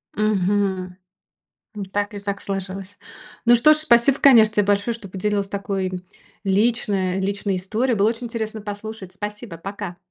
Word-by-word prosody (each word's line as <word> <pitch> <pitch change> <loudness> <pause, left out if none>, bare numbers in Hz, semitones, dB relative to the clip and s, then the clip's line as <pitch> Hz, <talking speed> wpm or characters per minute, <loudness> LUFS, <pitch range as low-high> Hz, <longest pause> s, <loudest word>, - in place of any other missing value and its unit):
Мгм. 195 -3 0 0.8
М, 205 -2 -4
так 205 +2 -2
и - - -4
так 200 0 -4
сложилось. 195 0 -5 0.5
Ну 240 0 +7
что 305 +6 +6
ж, - - -2
спасибо, 275 -2 +4
конечно, 225 -6 +7
те 210 - +4
большое, 205 +3 +1
что 215 -4 -10
поделилась 200 +1 -1
такой 195 -2 -2 0.5
лично 195 -2 +1
личной 195 0 -1
историей. 220 +6 0
Было 205 +2 +3
очень 235 +1 -5
интересно 220 -2 -4
послушать. 205 -2 -7
Спасибо, 210 -1 -7
пока! 195 -1 -6
205 Hz, 150 wpm, -22 LUFS, 195-220 Hz, 0.8 s, Ну